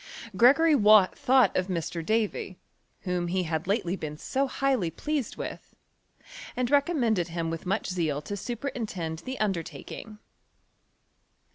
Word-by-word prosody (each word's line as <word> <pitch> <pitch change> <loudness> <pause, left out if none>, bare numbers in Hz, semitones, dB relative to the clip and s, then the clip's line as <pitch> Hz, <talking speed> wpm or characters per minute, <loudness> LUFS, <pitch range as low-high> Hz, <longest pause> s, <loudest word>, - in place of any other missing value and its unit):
Gregory 285 - +6
Wall 215 -6 +7
thought 260 0 +3
of 185 0 +1
Mr. 170 -2 -3
Davy, 215 -2 -1 0.4
whom 180 -2 -2
he 185 +1 0
had 160 +1 -3
lately 195 -3 0
been 150 -5 -6
so 270 - -1
highly 260 -9 0
pleased 285 - -3
with, - - -7 0.8
and 250 +1 -1
re* 285 -1 +6
commended 235 - 0
him 165 -1 -3
with 165 +2 -6
much 200 +4 0
zeal 165 -6 -1
to 205 - -4
superintend 210 - -4
the 260 +6 -6
undertaking. 195 +2 -4
200 Hz, 135 wpm, -27 LUFS, 170-250 Hz, 0.8 s, Wall